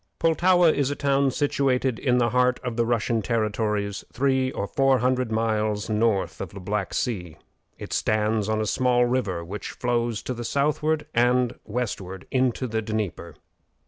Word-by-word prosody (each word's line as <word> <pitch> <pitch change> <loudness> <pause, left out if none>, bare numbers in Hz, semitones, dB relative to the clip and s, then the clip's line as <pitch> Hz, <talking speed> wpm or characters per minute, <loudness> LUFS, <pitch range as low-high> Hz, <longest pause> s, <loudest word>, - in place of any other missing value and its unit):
Pultowa 175 +1 +4
is 140 -2 0
a 145 - -2
town 140 -1 +2
situated 130 -3 0
in 125 -3 +2
the 120 -1 +2
heart 125 0 +2
of 125 -2 -3
the 115 0 +1
Russian 115 -1 +1
territories 105 -2 -1
three 130 0 +1
or 100 - -3
four 135 +4 +2
hundred 125 -1 0
miles 110 -1 0
north 105 -2 0
of 95 - -4
the - - -6
Black 100 +1 -2
Sea. 90 -10 -3 0.4
It - - -7
stands 110 0 +1
on 110 0 +1
a 110 - 0
small 125 +2 +2
river 105 -9 -1
which 100 +5 -6
flows 120 -2 -1
to 130 - -3
the 120 -1 -6
southward 150 +4 0
and 125 +1 +3
westward 100 -5 -4
into 130 -1 +1
the 110 -2 -2
Dnieper. 105 -6 -4
120 Hz, 165 wpm, -25 LUFS, 105-130 Hz, 0.4 s, Pultowa